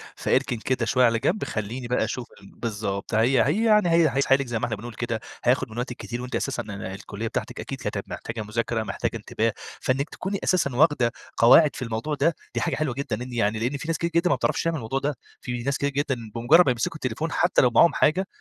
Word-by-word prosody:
فإركن 130 -2 0
كده 130 +3 -1
شوية 125 -1 +3
على 115 -1 +2
جنب، 170 - 0
خلّيني 115 +4 -4
بقى 125 - +1
أشوف 125 -2 -4
ال 100 - -15
بالضبط، 105 -3 -3
هي 120 +5 +4
هي 195 +12 +1
يعني 210 -5 +4
هي 165 -2 +5
هيسحلِك 135 -1 +3
زي 115 -2 -2
ما - - 0
إحنا 110 - -2
بنقول 115 +3 -8
كده 115 0 -3 0.2
هياخد 130 0 +2
من 110 - -10
وقتِك 125 0 -3
كتير، 120 +1 -5
وأنتِ 125 +1 -5
أساسًا 135 - -2
ال 105 - -9
الكليّة 100 +3 -5
بتاعتِك - - -4
أكيد - - -6
كانت - - -4
محتاجة 110 0 -5
مذاكرة، 110 +1 -2
محتاجة - - -3
انتباه، - - -1 0.3
فإنِّك 135 +3 0
تكوني 195 +1 -4
أساسًا 140 -9 +1
واخدة 140 -5 +3 0.3
قواعد 145 +6 +6
في - - -7
الموضوع 115 +6 -2
ده، 150 +3 +2 0.2
دي - - 0
حاجة - - 0
حلوة 145 -5 -1
جدًا، 125 -4 -3
إن 125 -1 -8
يعني 110 -1 +1
لإن 125 +5 -1
في 155 - -7
ناس 165 -1 0
كتير 170 - -1
جدًا 175 +1 +3
ما - - +4
بتعرفش - - 0
تعمل 165 -1 0
الموضوع 135 0 -2
ده، 145 0 -2 0.2
في 120 -1 -4
ناس 140 +1 0
كتير 140 - 0
جدًا 140 -1 -1 0.2
بمجرّد 155 +10 +5
ما 130 - +3
يمسكوا 160 +8 -2
التليفون 150 +4 -3
حتى 175 - +3
لو 125 - +4
معاهم 170 - +5
حاجة، 185 +6 +2
125 Hz, 230 wpm, -25 LUFS, 115-150 Hz, 0.3 s, قواعد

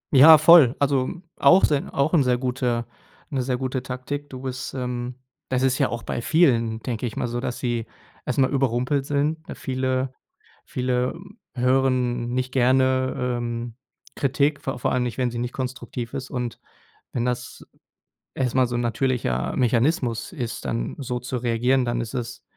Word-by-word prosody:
Ja 155 +4 +10
voll. 155 -5 +7
Also, 135 -2 +1 0.3
auch 185 +2 +6
sen 145 -2 0
auch 140 +4 0
'n 165 - +5
sehr 125 -1 +2
guter 125 -2 -1 0.5
'ne 135 -2 0
sehr 125 0 -1
gute 130 0 -2
Taktik. 135 +3 -5
Du 130 -1 -8
bist, 130 0 -5
ähm 125 -1 -3 0.3
das 130 0 0
ist 130 +1 +2
ja 135 - +2
auch 120 -1 -5
bei 120 - -3
vielen, 115 -8 +2
denke 120 -1 -2
ich 110 - -7
mal - - -1
so, 120 +1 -3
dass 125 -1 -3
sie 120 -2 -2 0.4
erstmal 130 +1 +1
überrumpelt 135 +1 0
sind, 150 +3 -1
ne? - - -5
Viele 130 0 -2 0.5
viele, 125 0 -1
ähm, 195 +6 -14 0.2
hören 125 -1 +1
nicht 130 0 -1
gerne, 130 0 +2
ähm, 120 -1 -3 0.4
Kritik, 140 +2 +1
vor 135 - -3
vor 125 - -1
allem 130 - +1
nicht, 120 -1 -3
wenn 125 -2 0
sie 120 - -4
nicht 120 0 -3
konstruktiv 125 -2 -5
ist. 135 0 -5
Und 125 -3 -4 0.5
wenn 120 -1 -1
das 125 0 -4 0.7
erstmal 130 -1 +1
so 120 - -4
'n 120 - 0
natürlicher 115 - -1
Mechanismus 120 +1 +1
ist, 120 -7 -5
dann 115 - -2
so 125 -2 -3
zu 125 0 -3
reagieren, 125 +2 +1
dann 120 0 -1
ist 115 0 -6
es 120 -3 -5
125 Hz, 175 wpm, -24 LUFS, 120-135 Hz, 0.7 s, Ja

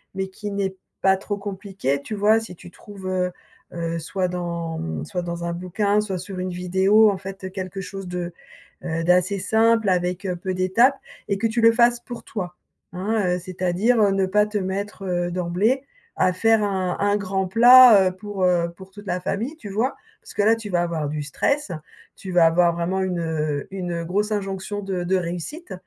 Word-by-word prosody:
mais 190 0 -2
qui 205 +2 -7
n'est 195 -1 -2 0.3
pas 190 0 +5
trop 205 +1 -4
compliqué, 195 -8 -3
tu 215 - -5
vois? 210 +2 +4
Si 200 -5 -9
tu 175 - -13
trouves, 200 -2 -10
heu 180 -1 0 0.4
heu, 170 -1 -3
soit 185 +3 -2
dans 170 -2 -4
mmh, 80 -2 -4
soit 180 - -3
dans 170 0 -4
un 170 - -2
bouquin, 200 +4 0
soit 195 -3 -3
sur 185 +1 -7
une 185 0 -2
vidéo, 190 +4 +4
en 195 - -1
fait, 190 0 -7
quelque 190 0 -5
chose 195 0 -7
de 175 -1 -4 0.5
heu, 165 -1 -2
d'assez 180 +3 +3
simple 220 +2 +3
avec, 180 +1 0
heu, 180 -2 -1
peu 185 +2 -4
d'étapes. 190 +9 +3 0.3
Et 200 - +1
que 225 - +1
tu 225 +1 -1
le 230 - +7
fasses 240 +1 +3
pour 240 -1 -8
toi. 180 -5 -5 0.4
Hein, 190 -1 0
heu, - - -6
c'est-à-dire, 185 +6 +1
heu, 200 - +4
ne 195 -1 +2
pas 210 +2 +3
te 210 0 -3
mettre, 195 +1 -4
heu, 175 -1 -1
d'emblée 185 +9 0 0.3
à 185 - +3
faire 225 +3 +3
un 190 -3 -1
un 205 0 +2
grand 190 -1 -2
plat, 235 -1 +8
heu, - - -6
pour, 200 -1 -5
heu, 175 -2 +2
pour 190 +1 -13
toute 205 +1 -12
la 180 0 -1
famille, 235 - -3
tu 210 -10 -9
vois? 225 +7 -1 0.3
Parce - - -13
que - - +1
là 225 +2 +5
tu 220 -2 -7
vas 175 -2 +1
avoir 165 -3 -2
du 150 0 -3
stress, 280 - -1 0.5
tu 190 - -7
vas 175 -2 +5
avoir 170 +1 +3
vraiment 175 +3 -1
une, 185 -2 -1
heu, 155 -3 -2
une 175 -3 -3
grosse 205 +5 -1
injonction 195 0 -3
de 190 -3 -3
de 190 - +1
réussite. 180 - -5
190 Hz, 205 wpm, -23 LUFS, 180-205 Hz, 0.5 s, plat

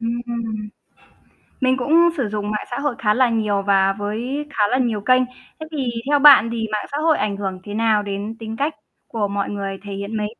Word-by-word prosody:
Ưm, 235 +1 -2
ừm. 225 -3 -4 0.9
Mình 260 0 +3
cũng 330 +7 +4
sử 240 -6 -1
dụng 210 0 -3
mạng 210 - -3
xã 245 - -2
hội 280 -4 -1
khá 210 -1 +2
là 255 0 +3
nhiều 215 -3 0
và 195 -1 +4
với 230 +8 -3
khá 220 -7 0
là 255 - +3
nhiều 235 -5 0
kênh. 255 +4 +4 0.4
Thế 315 - -7
thì 270 -5 -2 0.2
theo 290 - +4
bạn 280 -5 +8
thì 225 -1 -2
mạng 210 -1 -2
xã 285 - -2
hội 315 0 +2
ảnh 200 -2 -1
hưởng 190 -2 -4
thế 205 - -7
nào 215 -1 +2
đến 205 +2 -4
tính 225 -1 -6
cách 290 +4 0 0.3
của 215 -3 -2
mọi 200 0 -2
người 195 -1 -4
thể 200 -1 -7
hiện 200 +3 -4
mình? 210 0 -1
225 Hz, 225 wpm, -21 LUFS, 205-255 Hz, 0.9 s, bạn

